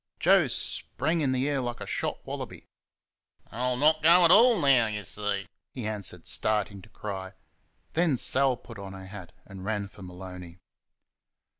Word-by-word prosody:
Joe -, -, +5 dB
sprang 160 Hz, +5 st, -2 dB
in 135 Hz, -3 st, +1 dB
the 130 Hz, +2 st, 0 dB
air 140 Hz, -2 st, 0 dB
like 120 Hz, -1 st, -4 dB
a -, -, -6 dB
shot -, -, -3 dB
wallaby. -, -, -7 dB, 0.9 s
"I'll 125 Hz, +2 st, -1 dB
not 155 Hz, +3 st, +3 dB
go 170 Hz, +3 st, +7 dB
AT 165 Hz, -, +6 dB
ALL 235 Hz, +3 st, +7 dB
now 135 Hz, -6 st, +4 dB
y' 105 Hz, -1 st, -4 dB
see!" 105 Hz, -1 st, -3 dB, 0.3 s
he 125 Hz, -4 st, -5 dB
answered, 100 Hz, -5 st, -5 dB
starting 105 Hz, -2 st, -1 dB
to -, -, -17 dB
cry. 95 Hz, -2 st, -6 dB, 0.6 s
Then 160 Hz, -5 st, +2 dB
Sal 130 Hz, +1 st, +3 dB
put 115 Hz, -3 st, -12 dB
on 100 Hz, -1 st, -8 dB
her 95 Hz, 0 st, -9 dB
hat 95 Hz, -2 st, -10 dB
and 95 Hz, -2 st, -10 dB
ran 100 Hz, -1 st, -2 dB
for 105 Hz, -, -16 dB
Maloney. 90 Hz, -1 st, -9 dB
110 Hz, 165 wpm, -28 LUFS, 95-140 Hz, 0.9 s, go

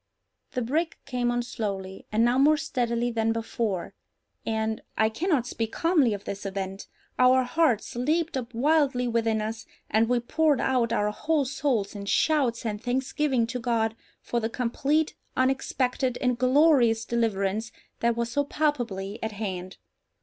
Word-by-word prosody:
The 250 Hz, -, -1 dB
brig 315 Hz, +8 st, -1 dB
came 245 Hz, -1 st, -1 dB
on 240 Hz, 0 st, 0 dB
slowly, 195 Hz, -5 st, -5 dB
and 220 Hz, +2 st, +3 dB
now 245 Hz, +2 st, +3 dB
more 300 Hz, +3 st, +5 dB
steadily 245 Hz, -6 st, -1 dB
than 225 Hz, -1 st, +1 dB
before, 225 Hz, -4 st, -2 dB, 0.5 s
and—I 220 Hz, 0 st, -1 dB
cannot 290 Hz, -, 0 dB
speak 225 Hz, -2 st, -3 dB
calmly 310 Hz, -, +3 dB
of 200 Hz, -, -9 dB
this 200 Hz, 0 st, -5 dB
event—our 200 Hz, +6 st, 0 dB
hearts 250 Hz, -5 st, +1 dB
leaped 310 Hz, +6 st, 0 dB
up 250 Hz, -2 st, -4 dB
wildly 270 Hz, -1 st, +2 dB
within 225 Hz, -2 st, +1 dB
us, 220 Hz, +1 st, -5 dB, 0.2 s
and 225 Hz, +1 st, +3 dB
we 245 Hz, -1 st, +3 dB
poured 295 Hz, +3 st, +2 dB
out 250 Hz, -3 st, +1 dB
our 210 Hz, -2 st, +1 dB
whole 300 Hz, +5 st, 0 dB
souls 260 Hz, -6 st, -1 dB
in 200 Hz, -1 st, -7 dB
shouts 260 Hz, -3 st, +2 dB
and 210 Hz, -2 st, -3 dB
thanksgiving 260 Hz, +1 st, 0 dB
to 250 Hz, +2 st, -4 dB
God 225 Hz, -2 st, 0 dB, 0.3 s
for 240 Hz, -, -1 dB
the 225 Hz, -1 st, -2 dB
complete, 275 Hz, +6 st, 0 dB, 0.2 s
unexpected, 260 Hz, -1 st, 0 dB
and 250 Hz, -1 st, +1 dB
glorious 255 Hz, -4 st, +4 dB
deliverance 220 Hz, -2 st, -1 dB, 0.3 s
that 235 Hz, 0 st, +1 dB
was 235 Hz, 0 st, -1 dB
so 285 Hz, +4 st, +1 dB
palpably 235 Hz, -9 st, -2 dB
at 220 Hz, -1 st, -3 dB
hand. 190 Hz, -3 st, -5 dB
235 Hz, 150 wpm, -26 LUFS, 220-270 Hz, 0.5 s, more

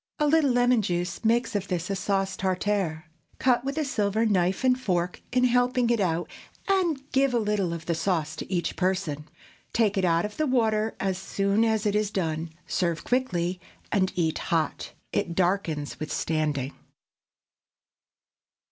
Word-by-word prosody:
A 300 Hz, -, +2 dB
little 300 Hz, -1 st, +4 dB
lemon 245 Hz, -1 st, +3 dB
juice 175 Hz, 0 st, -2 dB
makes 230 Hz, 0 st, +2 dB
of 200 Hz, -1 st, -1 dB
this 175 Hz, -2 st, -2 dB
a -, -, 0 dB
sauce 195 Hz, 0 st, 0 dB
tartare. 185 Hz, -3 st, -1 dB, 0.3 s
Cut 250 Hz, -2 st, +2 dB
with 275 Hz, +3 st, -3 dB
a 310 Hz, -, +1 dB
silver 215 Hz, -3 st, +1 dB
knife 190 Hz, 0 st, +1 dB
and 255 Hz, 0 st, +3 dB
fork 180 Hz, -6 st, -1 dB
in 250 Hz, 0 st, +2 dB
helping 245 Hz, 0 st, +3 dB
it 235 Hz, -, +2 dB
out, 175 Hz, -3 st, 0 dB, 0.4 s
and 365 Hz, -7 st, +2 dB
give 270 Hz, -1 st, +2 dB
a -, -, +3 dB
little 210 Hz, -5 st, 0 dB
of 170 Hz, -1 st, -5 dB
the 170 Hz, -, 0 dB
sauce 160 Hz, -2 st, -1 dB
to -, -, -7 dB
each 175 Hz, -2 st, -1 dB
person. 180 Hz, -6 st, -1 dB, 0.4 s
Take 215 Hz, -3 st, +2 dB
it -, -, 0 dB
out 170 Hz, 0 st, +3 dB
of 210 Hz, -, -7 dB
the 310 Hz, -, +1 dB
water 220 Hz, -4 st, +1 dB
as 190 Hz, -1 st, -1 dB
soon 200 Hz, +2 st, +1 dB
as 220 Hz, -1 st, +1 dB
it 205 Hz, -, +2 dB
is 210 Hz, -1 st, +1 dB
done, 165 Hz, -4 st, -2 dB, 0.2 s
serve 170 Hz, -3 st, -1 dB
quickly, 185 Hz, -8 st, 0 dB, 0.3 s
and 190 Hz, -3 st, +2 dB
eat 165 Hz, -3 st, 0 dB
hot. 160 Hz, -3 st, -1 dB, 0.2 s
It 170 Hz, -, -1 dB
darkens 175 Hz, -5 st, 0 dB
with 155 Hz, -, -5 dB
standing. 150 Hz, -4 st, -1 dB
195 Hz, 165 wpm, -26 LUFS, 175-235 Hz, 0.4 s, little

